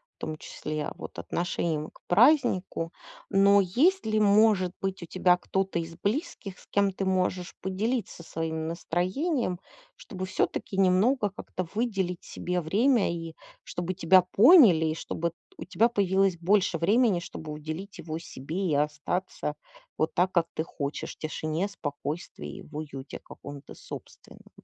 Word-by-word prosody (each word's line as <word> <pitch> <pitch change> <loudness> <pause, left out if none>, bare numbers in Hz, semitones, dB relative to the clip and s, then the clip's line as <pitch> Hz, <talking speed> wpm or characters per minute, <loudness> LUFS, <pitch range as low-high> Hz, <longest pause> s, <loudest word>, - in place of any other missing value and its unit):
в - - -65
том 155 0 -4
числе, 155 0 -5
вот - - -9
отношением 165 -3 -2
к - - -21
празднику. 200 - +3 0.4
Но 200 +1 +5
есть 290 - +2
ли, 215 0 +1
может 205 -3 +4
быть, 195 -1 -3
у - - -5
тебя 180 0 +3
кто-то 190 0 -1
из 165 0 -6
близких, 205 - -3
с - - -19
кем 200 -1 +2
ты 195 - -4
можешь 185 -1 0
поделиться 205 +1 -2
своим 160 -1 -3
настроением? 185 - -1 0.4
Чтобы 185 - -7
всё-таки 190 +1 -2
немного 205 +5 +3
как-то 185 -2 -6
выделить 195 -6 -1
себе 180 0 -3
время, 215 - +3
и 165 -1 -6 0.3
чтобы 175 +1 -4
тебя 185 +1 +6
поняли, 200 - +7
и, 155 0 0
чтобы 170 0 -3 0.2
у - - -7
тебя 225 +5 +3
появилось 195 -4 +2
больше 185 +1 +2
времени, 205 +3 +3
чтобы 160 -2 -8
уделить 155 +6 -6
его 160 -1 -5
себе, 165 +3 -4
и - - +2
остаться 150 +2 -2 0.4
вот 160 +1 0
так, 180 +1 +2
как 170 -3 +2
ты 160 - -1
хочешь: 145 -3 -5
в - - -49
тишине, 155 +3 -2
спокойствии, 155 -2 -6
и - - -9
в 155 -5 -14
уюте 145 -3 -7
каком-то 140 0 -11
собственном. - - -11
185 Hz, 150 wpm, -28 LUFS, 165-200 Hz, 0.4 s, поняли